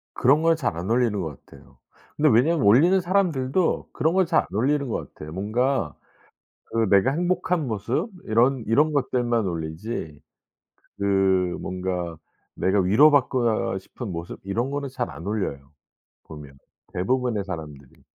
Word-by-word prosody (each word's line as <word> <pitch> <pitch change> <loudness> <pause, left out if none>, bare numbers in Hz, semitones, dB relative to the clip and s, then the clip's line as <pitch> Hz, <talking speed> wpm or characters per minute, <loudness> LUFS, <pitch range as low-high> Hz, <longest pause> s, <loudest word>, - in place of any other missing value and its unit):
그런 140 +5 +4
걸 165 0 +4
잘 125 - -2
안 90 +5 -4
올리는 115 -4 +1
것 80 -6 -6
같아요. - - -18 0.4
근데 150 0 +3
왜냐하면 130 +3 +3
올리는 165 - +5
사람들도 175 -4 0
그런 160 +3 +1
걸 190 -1 +3
잘 165 -1 +3
안 - - -11
올리는 140 +4 +1
것 115 - -5
같아요. 75 0 -9
뭔가 120 +8 -1 0.7
그 115 -2 0
내가 100 +7 +4
행복한 175 -1 0
모습 120 - -2
이런 120 +2 +2
이런 150 +8 +3
것들만 120 -6 0
올리지 80 -1 -5 0.8
그 100 - -4 0.6
뭔가 90 -3 -4 0.4
내가 95 +1 +2
위로 110 +12 +5
받고 130 -4 +2 0.2
아 - - -2
싶은 105 +2 -8
모습 85 0 -6
이런 115 +7 -2
거는 140 -1 -3
잘 125 -2 -4
안 85 - -10
올려요 70 -10 -3 0.5
보면 70 -3 -11 0.4
대부분의 115 +2 0
사람들이. 75 -7 -9
115 Hz, 295 characters per minute, -24 LUFS, 95-140 Hz, 0.8 s, 올리는